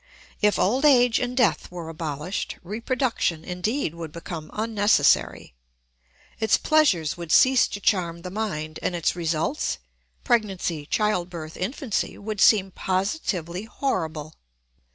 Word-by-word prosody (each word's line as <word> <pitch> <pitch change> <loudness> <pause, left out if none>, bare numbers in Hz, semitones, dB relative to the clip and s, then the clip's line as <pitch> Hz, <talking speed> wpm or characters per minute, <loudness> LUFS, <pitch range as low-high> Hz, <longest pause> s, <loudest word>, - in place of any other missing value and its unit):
If 210 -1 +3
old 250 +8 +1
age 245 -5 +5
and 250 0 -3
death 245 -5 +2
were 175 -2 -7
abolished, 160 +2 -4
reproduction, 225 - -1
indeed, 180 - -2
would 165 -2 -7
become 165 -1 -7
unnecessary: 215 - +2 0.9
its 220 -2 +3
pleasures 210 - +2
would 170 -2 -6
cease 260 -1 +5
to 200 - -6
charm 170 -4 0
the 180 - -6
mind, 160 -7 -4
and 180 - -1
its 170 0 0
results—pregnancy, 175 - -2
child 210 -4 0
birth, 160 -3 -8
infancy—would 215 -1 -3
seem 195 -3 +5
positively 185 - -2
horrible. 160 - -3
190 Hz, 115 wpm, -24 LUFS, 165-225 Hz, 0.9 s, age